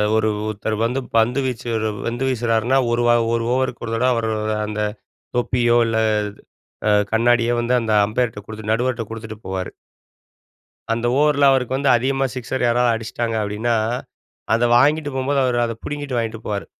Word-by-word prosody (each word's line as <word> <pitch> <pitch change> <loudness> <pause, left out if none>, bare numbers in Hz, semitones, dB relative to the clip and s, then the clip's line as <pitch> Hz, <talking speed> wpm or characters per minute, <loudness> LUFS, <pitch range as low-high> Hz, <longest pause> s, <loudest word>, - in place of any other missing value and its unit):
ஒரு 110 0 +2 0.2
ஒருத்தர் 110 +1 -3
வந்து, 125 +3 -1 0.2
பந்து 120 +4 +2
வீச்சு 125 -1 -4 0.4
பந்து 120 +2 -2
வீசுறார்ன்னா 120 +1 +1
ஒரு 120 0 +1 0.3
1 115 - -1
ஓவருக்கு 130 -1 -1
ஒரு 115 - -4
தடவ 125 +3 +2
அவர் 115 -1 -1 0.4
அந்த 105 0 -3 0.6
தொப்பியோ, 120 -1 +2
இல்ல 115 0 0 0.9
அ - - +4 0.2
கண்ணாடியோ 120 +1 +3
வந்து 120 +1 0
அந்த 110 -1 -2 0.2
அம்பயர்ட்ட 110 0 -1
குடுத்துட்டு, 110 0 -5
நடுவர்கிட்ட 120 0 0
குடுத்துட்டு 110 -1 -7
போவார். 95 -1 -3 1.2
அந்த 115 +1 -2
ஓவர்ல 145 -1 +4
அவருக்கு 130 -1 +1
வந்து 140 0 +1
அதிகமா 135 +2 0
சிக்ஸர் 130 +1 -3
யாராவது 120 0 +3
அடிச்சுட்டாங்க 115 +1 -3
அப்டின்னா, 105 +3 -1 0.8
அத 115 +1 +2
வாங்கிட்டு 145 +3 +2
போகும்போது 135 +1 0
அவரு 125 -1 +1
அத 115 - -3
புடுங்கிட்டு 145 -3 -4
வாங்கிட்டு 115 -1 -3
போவாரு. 100 -2 -3
120 Hz, 150 wpm, -21 LUFS, 110-130 Hz, 1.2 s, அ